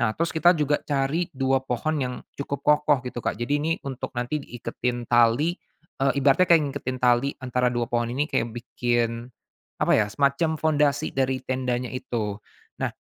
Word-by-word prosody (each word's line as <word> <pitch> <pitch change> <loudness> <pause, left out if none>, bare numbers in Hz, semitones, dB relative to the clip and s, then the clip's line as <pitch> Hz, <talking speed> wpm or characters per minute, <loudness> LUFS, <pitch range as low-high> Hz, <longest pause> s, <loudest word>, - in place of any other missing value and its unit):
nah 110 -2 +1
terus 170 0 0
kita 175 +2 +4
juga 150 -1 +1
cari 145 +5 -1
2 135 -3 +1
pohon 135 +4 -2
yang 125 -1 -2 0.2
cukup 140 0 -5
kokoh 150 -3 +3
gitu, 125 -1 -5
Kak, - - -2
jadi 145 +5 0
ini 165 +2 0
untuk 130 -2 -6
nanti 125 +5 -1
diiketin 120 -1 -4
tali, 120 +7 +3 0.5
eee, 135 0 +3
ibaratnya 140 +6 +4
kayak 170 -2 +7
ngingetin 135 -2 -4
tali 125 +1 +3 0.2
antara 125 0 +1
2 120 -1 -1
pohon 120 -1 +1
ini 130 +5 0
kaya 120 -6 -1
bikin 120 0 -2 0.5
apa - - +3
ya, 105 - +3
semacam 140 +7 +1
pondasi 150 -1 +1
dari 130 -1 0
tendanya 125 -1 -1
itu, 110 -5 -3 0.4
nah - - +1
130 Hz, 170 wpm, -25 LUFS, 120-145 Hz, 0.5 s, kayak